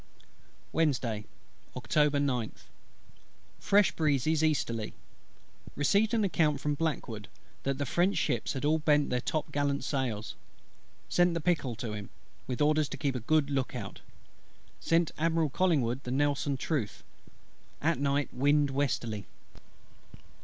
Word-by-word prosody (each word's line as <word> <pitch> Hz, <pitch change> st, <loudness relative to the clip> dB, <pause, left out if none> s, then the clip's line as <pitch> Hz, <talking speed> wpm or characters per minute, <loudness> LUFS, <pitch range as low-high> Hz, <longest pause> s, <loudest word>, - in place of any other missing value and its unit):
Wednesday, 125 Hz, -9 st, 0 dB, 0.5 s
October 145 Hz, +5 st, +2 dB
9th. 125 Hz, -6 st, -1 dB, 1.0 s
Fresh 205 Hz, -1 st, +4 dB
breezes 155 Hz, 0 st, +1 dB
easterly. 115 Hz, -8 st, 0 dB, 0.8 s
Received 205 Hz, +10 st, +2 dB
an 220 Hz, -, +2 dB
account 155 Hz, -7 st, +2 dB
from 150 Hz, +1 st, 0 dB
BLACKWOOD, 130 Hz, -9 st, -3 dB, 0.3 s
that 135 Hz, -1 st, -1 dB
the 145 Hz, -, -1 dB
French 175 Hz, +8 st, +1 dB
ships 120 Hz, -7 st, 0 dB
had 135 Hz, +1 st, -3 dB
all 155 Hz, +2 st, +3 dB
bent 150 Hz, -1 st, +2 dB
their 125 Hz, -1 st, +1 dB
top 155 Hz, +3 st, -2 dB
gallant 145 Hz, -1 st, 0 dB
sails. 120 Hz, -6 st, -2 dB, 0.7 s
Sent 175 Hz, -1 st, +3 dB
the -, -, 0 dB
Pickle 150 Hz, -7 st, 0 dB
to 110 Hz, -1 st, -5 dB
him, 105 Hz, -2 st, -6 dB, 0.4 s
with 125 Hz, +2 st, -3 dB
orders 150 Hz, -1 st, +3 dB
to -, -, -5 dB
keep 140 Hz, -3 st, 0 dB
a 125 Hz, -, -2 dB
good 145 Hz, +4 st, +1 dB
look 135 Hz, -2 st, -1 dB
out. 100 Hz, -6 st, -6 dB, 0.8 s
Sent 165 Hz, 0 st, +2 dB
Admiral 160 Hz, -2 st, +1 dB
COLLINGWOOD 135 Hz, -8 st, +1 dB
the 125 Hz, -, -7 dB
Nelson 140 Hz, +1 st, +1 dB
truth. 130 Hz, -, -2 dB, 0.8 s
At -, -, +1 dB
night 140 Hz, 0 st, 0 dB
wind 145 Hz, +2 st, +3 dB
westerly. 120 Hz, -7 st, -1 dB
145 Hz, 130 wpm, -30 LUFS, 125-155 Hz, 1.0 s, Fresh